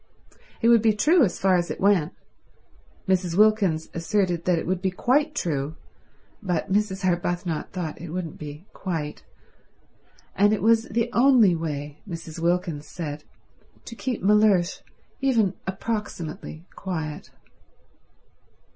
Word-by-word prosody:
It 230 - +5
would 235 -2 +6
be 220 -1 +4
true 305 - +4
as 185 -7 0
far 185 -1 +3
as 175 0 -1
it - - -5
went— 190 -5 +2 0.9
Mrs. 180 -2 +1
Wilkins 205 -7 +3
asserted 175 -1 0
that 180 -2 +3
it - - -3
would 185 +1 -1
be 190 - +1
quite 285 +10 +1
true, 150 - -2 0.7
but 185 -1 -2
Mrs. 200 -1 0
Arbuthnot 175 -2 -1
thought 170 -5 -5
it 175 - -7
wouldn't 170 -1 -5
be 150 +3 -8
quite—and 180 +4 -4
it 205 - -1
was 225 0 +4
the 230 +2 -1
only 240 -6 +5
way, 150 -2 -5
Mrs. 165 -2 -7
Wilkins 170 -3 -1
said, 150 -3 -6 0.6
to 230 - -8
keep 245 -4 -3
Mellersh 200 -3 +3 0.4
even 230 -8 +2
approximately 190 -6 -5
quiet. 160 -5 -5
185 Hz, 130 wpm, -25 LUFS, 165-210 Hz, 0.9 s, would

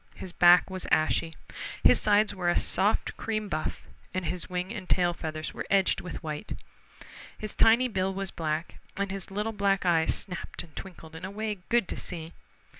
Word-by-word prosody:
His 185 - -7
back 175 0 +7
was 185 -1 -5
ashy. 160 +1 +2 0.5
His - - +6
sides 210 0 +4
were 180 -2 0
a 175 - +2
soft 205 +3 +1
cream 215 -2 -2
buff, 155 -4 -3 0.3
and 185 -1 -1
his 180 +2 -3
wing 180 +3 -3
and 200 -5 -7
tail 175 -1 +3
feathers 155 -2 -5
were - - -6
edged 195 -1 +3
with 180 - -7
white. 155 +6 -4 0.8
His 215 -1 -5
tiny 235 +3 +5
bill 190 -4 0
was 195 0 -3
black, 160 +1 -3 0.2
and 200 0 -1
his 195 -2 -4
little 210 +3 -2
black 200 -2 +1
eyes 165 -2 +3
snapped 180 -2 -4
and 165 -3 -17
twinkled 165 -4 -9
in 165 - -9
a 185 - -3
way 210 0 -3
good 235 -5 +3
to - - -4
see. 165 -2 -5
185 Hz, 190 wpm, -28 LUFS, 170-200 Hz, 0.8 s, back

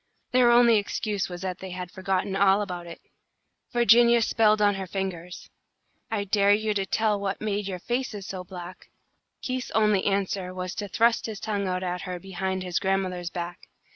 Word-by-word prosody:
Their 250 -1 +5
only 235 -1 +6
excuse 205 -1 -2
was 175 0 -7
that 185 -1 -4
they 190 - -7
had 180 -1 -6
forgotten 190 +1 -1
all 195 +1 +4
about 175 -3 -6
it. 165 - -9 0.7
Virginia 235 0 +5
spelled 215 -1 +3
on 205 -1 +4
her 195 -1 -5
fingers: 180 -2 -5 0.6
"I 210 -2 -1
dare 200 0 +4
you 215 0 -1
to 195 -1 -1
tell 215 -1 +1
what 200 -1 -3
made 205 -1 -2
your 190 -2 -3
faces 235 0 -3
so 185 -1 -6
black!" 180 0 -10 0.5
Keith's 255 0 -3
only 210 -3 +3
answer 195 -2 -1
was 180 -1 -4
to 205 - -4
thrust 230 +4 +2
his 215 -3 -6
tongue 205 -3 -2
out 185 0 -2
at 180 0 -3
her 180 -1 -5
behind 190 0 -3
his 180 -1 -1
grandmother's 190 -2 -1
back. 175 0 -6
195 Hz, 180 wpm, -26 LUFS, 185-215 Hz, 0.7 s, only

